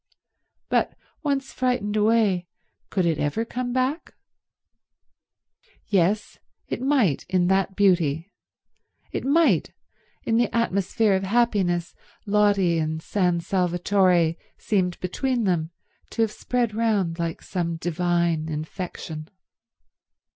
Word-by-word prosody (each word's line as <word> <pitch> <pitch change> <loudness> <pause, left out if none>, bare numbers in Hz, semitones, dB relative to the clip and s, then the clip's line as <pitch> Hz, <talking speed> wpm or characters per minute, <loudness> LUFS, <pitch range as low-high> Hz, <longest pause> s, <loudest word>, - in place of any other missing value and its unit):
But - - 0 0.2
once 275 -3 -1
frightened 250 -5 0
away, 210 -4 +2 0.4
could 185 -3 0
it 165 -3 +1
ever 180 +11 -1
come 245 +1 -3
back? 260 +6 -1 1.7
Yes, 200 +1 +1 0.3
it - - -4
might 260 - +2
in 185 -1 +2
that 190 0 +1
beauty, 175 -3 +2 0.8
it - - -3
might 320 +5 +3 0.5
in 225 - +1
the 240 - +2
atmosphere 205 -1 +1
of 190 - +1
happiness 195 -5 +1 0.3
Lotty 200 -5 +3
and 160 0 -2
San 180 0 0
Salvatore 180 -1 +2 0.2
seemed 185 -4 0
between 245 +6 -1
them 170 -5 0 0.4
to 225 -1 +1
spread 235 +1 -2
round 205 -7 0
like 165 -1 -3
some 170 -3 -2
divine 170 -1 0
infection. 155 0 -6
190 Hz, 105 wpm, -24 LUFS, 170-225 Hz, 1.7 s, might